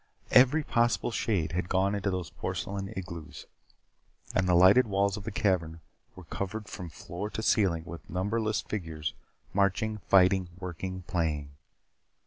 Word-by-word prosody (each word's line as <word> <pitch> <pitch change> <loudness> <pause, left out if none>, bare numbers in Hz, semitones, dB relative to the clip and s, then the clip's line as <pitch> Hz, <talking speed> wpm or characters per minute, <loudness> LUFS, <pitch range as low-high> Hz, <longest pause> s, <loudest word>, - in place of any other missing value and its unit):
Every 135 +5 +6
possible 120 -2 +1
shade 95 -9 0
had 90 +1 -2
gone 95 +1 +2
into 100 -1 -1
those 90 -4 -3
porcelain 95 +3 -4
igloos. 85 -4 -7 0.9
And 95 -1 +1
the 90 - +5
lighted 95 +8 +7
walls 100 -1 +1
of 105 - -8
the 110 - -3
cavern 90 -6 0 0.4
were 95 - -11
covered 100 +5 -5
from 90 -4 -7
floor 90 +6 -6
to 110 - -5
ceiling 95 -8 +2
with 85 -3 -10
numberless 105 +4 0
figures, 80 -7 -4 0.4
marching, 100 +2 +1
fighting, 95 -1 +4
working, 95 0 -5
playing. 75 -5 -2
95 Hz, 140 wpm, -29 LUFS, 85-105 Hz, 0.9 s, lighted